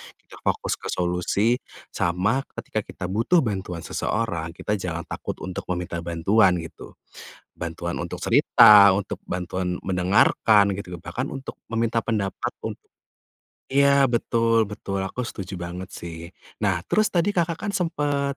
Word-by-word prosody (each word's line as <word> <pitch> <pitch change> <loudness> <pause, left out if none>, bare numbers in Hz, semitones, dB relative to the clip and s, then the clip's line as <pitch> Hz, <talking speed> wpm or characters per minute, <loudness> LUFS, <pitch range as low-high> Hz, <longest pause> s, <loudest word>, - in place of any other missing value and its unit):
kita - - -16
fokus - - -1
ke - - -7
solusi, 90 +7 0 0.3
sama 90 +9 +1 0.2
ketika 115 -2 -3
kita 90 -3 -6
butuh 125 - +3
bantuan 95 -6 -4
seseorang, 85 -7 -2
kita 105 -1 -2
jangan 85 -2 -4
takut - - -5
untuk 95 -1 -5
meminta 90 -2 -3
bantuan, 90 +4 +3
gitu. 80 - -11 0.6
Bantuan 85 +1 -4
untuk 85 - -5
cerita, 100 -2 +7
untuk 100 0 -3
bantuan 90 0 -3
mendengarkan 100 +2 +3
gitu, 90 -4 -7
bahkan 130 +8 -4
untuk 135 0 -7
meminta 115 +1 -1
pendapat 105 -4 -2
untuk - - -6 0.9
iya, 140 0 +5
betul 115 -1 +2
betul, 100 -2 -4
aku 95 +6 -3
setuju 95 -4 -6
banget 90 +1 -6
sih. 85 -1 -8 0.3
Nah 95 -3 +1
terus 215 0 +2
tadi 180 +3 +1
Kakak 170 -2 +1
kan 205 - -1
sempat 145 -6 -1
100 Hz, 135 wpm, -24 LUFS, 90-115 Hz, 0.9 s, cerita